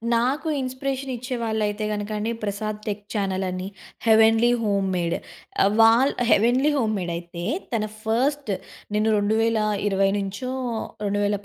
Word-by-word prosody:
నాకు 260 +7 0
ఇన్స్‌ప్రెషన్ 265 +1 -3
ఇచ్చే 250 +2 -4
వాళ్ళయితే 215 -1 -1
గనక 205 0 -4 0.3
'Prasad 210 +1 -3
tech 205 0 -3
చానలని' 190 -2 -2 0.4
'heavenly 225 +2 +5
home 200 -2 +1
made' 170 -1 0 0.5
ఆహ్, 200 +1 +3
వాల 230 +4 +6 0.2
'హెవెన్లీ 250 +7 +4
హోమ్‌మేడయితే 175 -7 -2 0.3
తన 215 -2 +1 0.2
ఫస్ట్, 260 +3 0 0.4
నేను 215 +1 +2
2020 210 -2 +1
నుంచో 200 +6 -4 0.6
రెండువేల 205 0 +1
215 Hz, 110 wpm, -24 LUFS, 200-235 Hz, 0.6 s, వాల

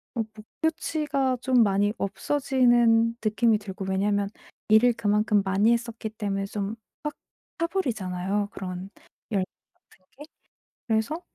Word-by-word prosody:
모 230 - +1
목표치가 285 +2 -1
좀 250 -3 +4
많이 200 +1 +2
없어지는 240 -1 +3
느낌이 215 +1 +3
들고 195 -1 -6
왜냐하면 200 +1 +1 0.4
일을 225 +3 +6
그만큼 210 -2 +2
많이 195 +4 +3
했었기 230 -2 -3
때문에 200 -2 -3
좀 200 +1 -3 0.3
확 300 - -2 0.4
타 335 - +1
버리잖아요? 205 - -1
그런 185 -2 -6 0.4
열정 190 -2 -1 0.4
같은 185 - -25
게. 295 - -9 0.6
그래서 230 +9 0
215 Hz, 275 characters per minute, -26 LUFS, 200-245 Hz, 0.6 s, 일을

